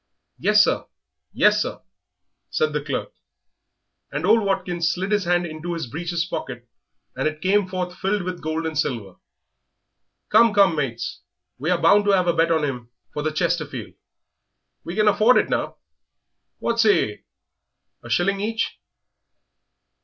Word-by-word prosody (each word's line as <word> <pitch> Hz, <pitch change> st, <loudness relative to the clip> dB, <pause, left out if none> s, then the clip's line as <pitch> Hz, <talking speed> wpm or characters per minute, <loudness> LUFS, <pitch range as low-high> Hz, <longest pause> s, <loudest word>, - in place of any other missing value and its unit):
"Yes, 210 Hz, 0 st, +5 dB
sir; -, -, 0 dB, 0.5 s
yes, -, -, +4 dB
sir," -, -, -3 dB, 0.7 s
said 465 Hz, -1 st, 0 dB
the -, -, -1 dB
clerk. -, -, -4 dB, 1.0 s
And -, -, -2 dB
old 230 Hz, -, +5 dB
Watkins 175 Hz, -4 st, 0 dB
slid 190 Hz, +4 st, -3 dB
his 205 Hz, -3 st, +1 dB
hand 175 Hz, 0 st, +2 dB
into 165 Hz, +1 st, -5 dB
his 165 Hz, -, -3 dB
breeches 165 Hz, +6 st, -3 dB
pocket, 125 Hz, -8 st, -6 dB, 0.5 s
and -, -, 0 dB
it 155 Hz, 0 st, -4 dB
came 195 Hz, +3 st, +2 dB
forth 180 Hz, -1 st, -3 dB
filled 195 Hz, +1 st, -1 dB
with 180 Hz, 0 st, -5 dB
gold 155 Hz, +1 st, -2 dB
and 160 Hz, -1 st, -3 dB
silver. 115 Hz, -10 st, -2 dB, 1.1 s
"Come, 220 Hz, 0 st, +5 dB
come, 195 Hz, -4 st, +5 dB
mates, 130 Hz, -6 st, -3 dB, 0.4 s
we 150 Hz, +6 st, -2 dB
are 180 Hz, -1 st, +2 dB
bound 200 Hz, +5 st, +5 dB
to 200 Hz, -, +4 dB
'ave 180 Hz, -2 st, +3 dB
a -, -, -5 dB
bet 165 Hz, 0 st, +2 dB
on 160 Hz, -2 st, +2 dB
him 125 Hz, -5 st, -4 dB, 0.2 s
for 150 Hz, -, -3 dB
the 155 Hz, +1 st, -1 dB
Chesterfield 155 Hz, -, -2 dB, 0.9 s
we 170 Hz, -, -6 dB
can 215 Hz, 0 st, +2 dB
afford 215 Hz, +4 st, +5 dB
it -, -, +2 dB
now; -, -, -2 dB, 0.8 s
what 235 Hz, 0 st, -2 dB
say 220 Hz, -, +4 dB
yer, 105 Hz, -, -10 dB, 0.8 s
a -, -, -11 dB
shilling 195 Hz, +2 st, +1 dB
each?" 225 Hz, +2 st, -2 dB
175 Hz, 155 wpm, -23 LUFS, 155-200 Hz, 1.1 s, Yes